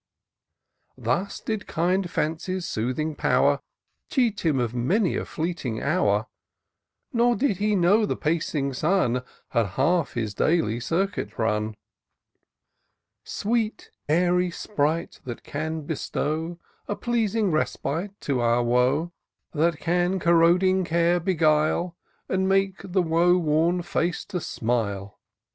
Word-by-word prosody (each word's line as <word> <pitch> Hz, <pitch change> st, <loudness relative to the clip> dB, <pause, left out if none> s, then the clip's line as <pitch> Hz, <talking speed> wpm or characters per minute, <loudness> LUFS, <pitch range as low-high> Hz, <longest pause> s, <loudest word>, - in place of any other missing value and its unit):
Thus 195 Hz, +4 st, -1 dB
did 215 Hz, -2 st, -4 dB
kind 180 Hz, +3 st, 0 dB
Fancy's 170 Hz, +3 st, -2 dB
soothing 130 Hz, +8 st, -2 dB
power -, -, +2 dB, 0.5 s
Cheat 240 Hz, -7 st, +1 dB
him 155 Hz, -6 st, +2 dB
of 120 Hz, -2 st, -1 dB
many 175 Hz, -, +1 dB
a -, -, -2 dB
fleeting 160 Hz, -9 st, -3 dB
hour; 110 Hz, -, +1 dB, 0.9 s
Nor 240 Hz, 0 st, +3 dB
did 250 Hz, -7 st, +1 dB
he 210 Hz, +1 st, +1 dB
know 200 Hz, +4 st, +4 dB
the -, -, -1 dB
pacing 150 Hz, -3 st, -1 dB
Sun 145 Hz, -4 st, +1 dB, 0.3 s
Had 115 Hz, -2 st, +2 dB
half 165 Hz, +3 st, +2 dB
his 110 Hz, -4 st, -2 dB
daily 120 Hz, -3 st, +1 dB
circuit 180 Hz, +10 st, -2 dB
run. 110 Hz, -2 st, 0 dB, 1.5 s
Sweet, 220 Hz, +1 st, -2 dB, 0.2 s
airy 180 Hz, +2 st, +3 dB
sprite, 165 Hz, -2 st, -2 dB
that 120 Hz, -2 st, -6 dB
can 160 Hz, +2 st, -3 dB
bestow 160 Hz, +2 st, -3 dB, 0.3 s
A 205 Hz, -, -2 dB
pleasing 225 Hz, -4 st, 0 dB
respite 170 Hz, +5 st, -2 dB
to 135 Hz, -3 st, -1 dB
our 120 Hz, +1 st, +2 dB
woe; 125 Hz, +8 st, +2 dB, 0.4 s
That 165 Hz, +1 st, +2 dB
can 175 Hz, +3 st, +1 dB
corroding 175 Hz, +2 st, +4 dB
care 170 Hz, +1 st, +2 dB
beguile, 165 Hz, 0 st, +1 dB, 0.3 s
And 190 Hz, 0 st, 0 dB
make 195 Hz, 0 st, +2 dB
the 185 Hz, -1 st, 0 dB
woe 170 Hz, +2 st, +3 dB
worn 170 Hz, +2 st, +1 dB
face 175 Hz, 0 st, -1 dB
to 180 Hz, -, -3 dB
smile 105 Hz, -6 st, -2 dB
170 Hz, 120 wpm, -25 LUFS, 140-185 Hz, 1.5 s, know